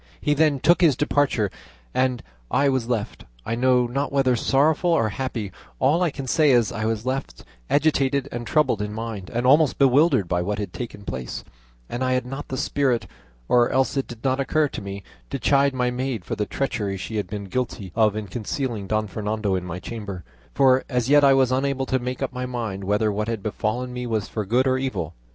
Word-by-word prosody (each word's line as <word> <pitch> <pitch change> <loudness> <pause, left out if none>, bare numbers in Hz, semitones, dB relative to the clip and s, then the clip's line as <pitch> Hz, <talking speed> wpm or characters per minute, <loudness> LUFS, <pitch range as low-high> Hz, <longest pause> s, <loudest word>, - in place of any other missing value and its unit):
He 150 - +1
then 150 -2 +2
took 170 +6 +4
his 160 -6 +5
departure 145 -9 +1 0.4
and 130 -2 +1 0.3
I 140 0 +3
was 130 -3 -1
left, 115 -4 -2 0.2
I - - -2
know 125 +1 +3
not 135 +4 -2
whether 135 -3 +3
sorrowful 145 +8 +2
or 115 -10 +3
happy; 115 -3 -4 0.3
all 150 +7 +3
I 175 - +3
can 135 -2 -6
say 150 +3 +3
is, 120 -5 +4
I 110 -1 -3
was 110 0 -1
left 135 +1 -3 0.3
agitated 140 -2 +2
and 120 -1 -5
troubled 150 -9 +2
in 105 0 -3
mind 110 -4 -5
and 120 +1 -1
almost 145 +2 +5
bewildered 135 - +4
by 90 0 0
what 100 +3 -2
had 105 -1 -4
taken 115 -4 -7
place, 65 -7 -5 0.4
and 120 +2 -3
I 130 0 +1
had 125 -1 0
not 135 +3 -6
the 130 - -4
spirit, 130 -3 0 0.4
or 120 -1 +4
else 130 +1 +1
it 135 - -1
did 115 -2 -10
not 130 0 +1
occur 150 +2 +2
to - - -6
me, 100 0 -7 0.3
to 135 - -2
chide 140 +1 +3
my 125 -1 +1
maid 125 -6 -3
for - - -3
the 105 - -2
treachery 105 -8 -2
she 110 +4 -5
had 105 - -2
been 100 +1 -5
guilty 105 -3 -3
of 110 -2 +3
in 110 -1 -3
concealing 110 +1 -3
Don 110 +1 0
Fernando 105 0 -2
in 90 -1 -1
my 85 0 -5
chamber; 100 -2 -6 0.3
for 130 -1 +4
as 125 -2 0
yet 145 0 +6
I 135 -1 +6
was 130 -2 +3
unable 135 0 0
to 130 0 0
make 125 +2 -4
up 130 - -3
my 125 0 -3
mind 110 -6 -4
whether 105 +2 +1
what 105 +2 -2
had 115 -4 -3
befallen 115 +4 -2
me 125 0 -4
was 110 -3 -1
for 110 -2 -4
good 125 +5 +3
or 130 0 +2
evil. 95 - -3
125 Hz, 215 wpm, -23 LUFS, 105-135 Hz, 0.4 s, yet